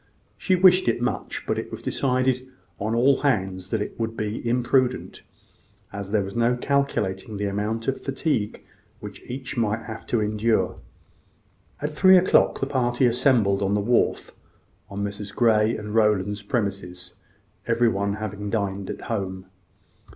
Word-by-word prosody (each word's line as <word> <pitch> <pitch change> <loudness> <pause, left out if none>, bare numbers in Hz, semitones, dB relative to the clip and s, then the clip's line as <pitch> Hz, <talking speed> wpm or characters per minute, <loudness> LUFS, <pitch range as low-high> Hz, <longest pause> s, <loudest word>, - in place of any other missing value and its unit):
She 185 - +1
wished 185 -2 +5
it 115 0 +2
much; 120 - -3
but - - -1
it - - -6
was - - -8
decided 130 -1 0 0.3
on 110 +3 -1
all 130 +3 +4
hands 95 -9 0
that 110 0 0
it - - -9
would 115 0 -3
be 105 +1 -3
imprudent, 125 +1 0 0.7
as 100 -1 -5
there 105 -1 +1
was 95 +2 -7
no 120 +1 +2
calculating 115 -7 -1
the 105 - -2
amount 105 +3 -2
of 135 - -1
fatigue 135 -6 -2 0.3
which - - -9
each 130 +1 -6
might 110 0 0
have 110 -1 -8
to 120 - +1
incur. 110 +1 +1 1.1
At 150 - -1
three 185 +5 +6
o'clock 180 +1 +3
the - - +2
party 125 -2 +1
assembled 120 -5 +3
on 100 +1 +1
the - - +2
wharf 115 +4 +1 0.6
on 100 +1 -4
Messrs. 100 0 -5
Grey 110 -1 +3
and 105 0 -7
Rowland's 105 -2 +2
premises, 100 -5 -3 0.5
everyone 110 -4 +1
having 105 -1 -5
dined 100 -3 -2
at - - -6
home. 95 -4 -4
110 Hz, 150 wpm, -24 LUFS, 100-125 Hz, 1.1 s, three